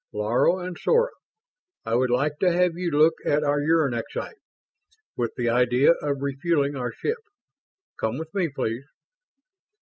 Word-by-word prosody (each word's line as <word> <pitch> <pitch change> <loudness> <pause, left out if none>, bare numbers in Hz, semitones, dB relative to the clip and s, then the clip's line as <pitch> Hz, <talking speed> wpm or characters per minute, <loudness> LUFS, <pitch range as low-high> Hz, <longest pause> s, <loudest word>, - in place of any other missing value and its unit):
"Laro 115 - +2
and 180 -1 -5
Sora, 480 +1 +2 0.7
I 115 - -2
would 125 +2 +2
like 145 +5 0
to 180 - +3
have 175 -1 +2
you 175 0 -2
look 155 +1 +4
at 150 +1 +1
our 145 0 +1
uranexite, 150 - -1 0.8
with 120 -2 -2
the 120 - -1
idea 125 +4 +4
of 140 -2 -2
refueling 140 0 0
our 125 -3 -3
ship. 455 - -3 0.8
Come 110 +3 -1
with 160 +1 -7
me, 185 -5 0
please?" 130 -1 -4
145 Hz, 145 wpm, -25 LUFS, 125-170 Hz, 0.8 s, look